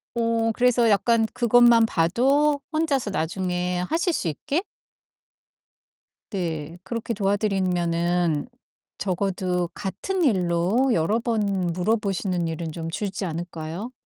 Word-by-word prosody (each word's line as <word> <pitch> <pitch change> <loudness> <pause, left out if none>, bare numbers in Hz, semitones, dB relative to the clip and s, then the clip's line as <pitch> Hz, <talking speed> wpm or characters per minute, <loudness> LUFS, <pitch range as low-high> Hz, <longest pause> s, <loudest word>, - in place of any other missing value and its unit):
어 230 -1 +1
그래서 245 -1 +3
약간 225 +3 +3
그것만 240 -1 +5
봐도 265 - +2
혼자서 290 -8 0
나중에 180 +1 -1
하실 340 +2 +1
수 180 - -1
있게? 285 - -2 1.7
네. 165 -4 -4
그렇게 230 +4 -3
도와드리면은 180 -4 0 0.5
적어도 180 -1 -1
같은 275 - -3
일로 190 - +2
여러 200 +7 +1
번 205 -6 0
물어보시는 190 -2 0
일은 165 0 -4
좀 165 0 -5
줄지 195 +3 -4
않을까요? 170 +5 -5
195 Hz, 240 characters per minute, -24 LUFS, 175-235 Hz, 1.7 s, 그것만